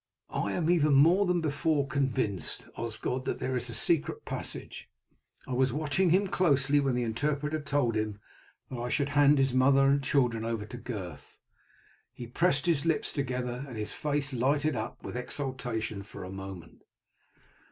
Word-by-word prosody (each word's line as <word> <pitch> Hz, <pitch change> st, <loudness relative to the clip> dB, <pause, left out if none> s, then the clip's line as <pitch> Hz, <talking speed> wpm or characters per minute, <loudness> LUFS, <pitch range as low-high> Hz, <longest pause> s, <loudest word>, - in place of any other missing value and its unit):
"I -, -, -1 dB
am 165 Hz, -3 st, 0 dB
even 155 Hz, -4 st, +4 dB
more 175 Hz, +8 st, +5 dB
than 180 Hz, -1 st, +2 dB
before 150 Hz, -1 st, +1 dB
convinced, 130 Hz, -8 st, -2 dB
Osgod, 115 Hz, +3 st, -3 dB
that -, -, -1 dB
there 130 Hz, 0 st, -2 dB
is 125 Hz, 0 st, -3 dB
a 115 Hz, -, -5 dB
secret 160 Hz, +7 st, 0 dB
passage. -, -, -6 dB, 0.6 s
I 130 Hz, -, -3 dB
was 130 Hz, +1 st, +2 dB
watching 155 Hz, +6 st, +1 dB
him 190 Hz, +4 st, +4 dB
closely 145 Hz, -7 st, +3 dB
when 135 Hz, -3 st, +1 dB
the 125 Hz, -, 0 dB
interpreter 150 Hz, +6 st, -1 dB
told 145 Hz, -5 st, +1 dB
him 110 Hz, -1 st, -2 dB, 0.5 s
that 125 Hz, -, -4 dB
I 120 Hz, +1 st, -3 dB
should 140 Hz, +2 st, 0 dB
hand 145 Hz, 0 st, +5 dB
his 135 Hz, -1 st, +2 dB
mother 135 Hz, +1 st, +5 dB
and 140 Hz, +1 st, +4 dB
children 125 Hz, -5 st, +1 dB
over 115 Hz, -2 st, -2 dB
to 125 Hz, -, -8 dB
Gurth. 95 Hz, -11 st, -7 dB, 0.8 s
He 120 Hz, -, -7 dB
pressed 145 Hz, +3 st, +1 dB
his 165 Hz, -5 st, +2 dB
lips 165 Hz, -1 st, 0 dB
together, 125 Hz, -2 st, -2 dB
and 125 Hz, -4 st, -8 dB
his 105 Hz, -1 st, -4 dB
face 145 Hz, -2 st, -2 dB
lighted 140 Hz, +4 st, +1 dB
up 110 Hz, -1 st, -5 dB
with -, -, -6 dB
exultation 125 Hz, -5 st, -3 dB
for 100 Hz, -, -9 dB
a 90 Hz, -, -7 dB
moment." 95 Hz, -3 st, -9 dB
135 Hz, 170 wpm, -29 LUFS, 120-145 Hz, 0.8 s, more